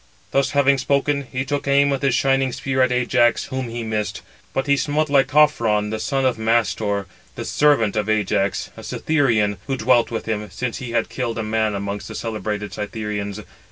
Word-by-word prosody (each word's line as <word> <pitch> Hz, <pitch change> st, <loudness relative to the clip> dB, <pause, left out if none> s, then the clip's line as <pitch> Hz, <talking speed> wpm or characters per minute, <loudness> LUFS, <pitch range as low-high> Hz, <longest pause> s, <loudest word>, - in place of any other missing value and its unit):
Thus 135 Hz, -1 st, +2 dB
having 140 Hz, -1 st, +4 dB
spoken, 140 Hz, +1 st, 0 dB
he 130 Hz, +1 st, -2 dB
took 145 Hz, 0 st, -3 dB
aim 140 Hz, +1 st, +4 dB
with 135 Hz, -, -1 dB
his 135 Hz, -3 st, +2 dB
shining 135 Hz, -1 st, +2 dB
spear 130 Hz, +1 st, -1 dB
at 130 Hz, 0 st, +3 dB
Ajax, 120 Hz, -1 st, +2 dB
whom 130 Hz, -3 st, -4 dB
he 115 Hz, 0 st, -4 dB
missed; 110 Hz, -2 st, -3 dB, 0.3 s
but 135 Hz, -, -1 dB
[he 140 Hz, -1 st, +3 dB
smote] 150 Hz, +1 st, 0 dB
Lycophron, 135 Hz, -7 st, +3 dB
the 110 Hz, -, -3 dB
son 135 Hz, +3 st, 0 dB
of 125 Hz, -3 st, +1 dB
Mastor, 105 Hz, -2 st, +1 dB, 0.3 s
the -, -, -5 dB
servant 140 Hz, -9 st, +2 dB
of 105 Hz, -1 st, -1 dB
Ajax, 100 Hz, -3 st, 0 dB
a -, -, -10 dB
Cytherean, 115 Hz, -10 st, +1 dB
who 135 Hz, -1 st, -1 dB
dwelt 120 Hz, 0 st, +3 dB
with 115 Hz, -, -4 dB
him, 105 Hz, -2 st, -3 dB
since 115 Hz, +5 st, -4 dB
he 125 Hz, -, -6 dB
had 115 Hz, -1 st, +1 dB
killed 120 Hz, -3 st, -3 dB
a 115 Hz, -, -2 dB
man 110 Hz, -1 st, 0 dB
amongst 100 Hz, 0 st, -4 dB
the -, -, -8 dB
celebrated 105 Hz, -3 st, -4 dB
Cythereans. 105 Hz, -1 st, -4 dB
115 Hz, 190 wpm, -21 LUFS, 105-135 Hz, 0.3 s, having